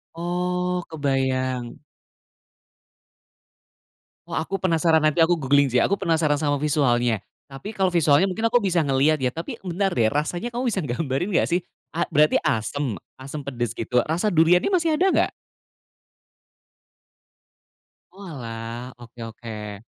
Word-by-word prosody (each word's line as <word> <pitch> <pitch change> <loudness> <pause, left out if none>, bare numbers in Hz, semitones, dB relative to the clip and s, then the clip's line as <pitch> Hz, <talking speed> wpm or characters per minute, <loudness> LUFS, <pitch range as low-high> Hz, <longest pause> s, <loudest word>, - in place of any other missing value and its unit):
Oh, 180 +1 -1
kebayang. 130 -4 -1 2.5
Oh - - -4
aku 195 -2 -2
penasaran, 165 -3 +3
nanti 155 +1 +2
aku 165 +1 +5
googling 140 -3 +3
sih. 125 - +4
Aku 200 - +2
penasaran 160 -5 +1
sama 145 -2 0
visualnya, 120 -6 +2 0.3
tapi 140 +11 -8
kalau 190 -3 +1
visualnya 165 +1 +3
mungkin 220 +5 -2
aku 240 +1 +3
bisa 180 -6 +1
ngeliat 140 +3 +3
ya. 125 -2 -1
Tapi 195 - -6
bentar 185 +3 0
deh, 115 -11 +2
rasanya 175 +10 -2
kamu 245 - -2
bisa 200 - -1
gambarin 135 +6 -2
nggak - - +3
sih? 175 - +2 0.3
A 165 - -1
berarti 150 +1 +3
asem? 125 +3 -1 0.2
Asem 140 +3 -7
pedes 120 -5 -3
gitu? 115 +2 -2
Rasa 170 +7 0
duriannya 175 - +4
masih 335 -4 +2
ada 355 +5 +2
nggak? - - +2 2.8
Oalah, 120 - -7
oke 120 0 -14
oke. 110 -2 -8
155 Hz, 130 wpm, -23 LUFS, 130-180 Hz, 2.8 s, aku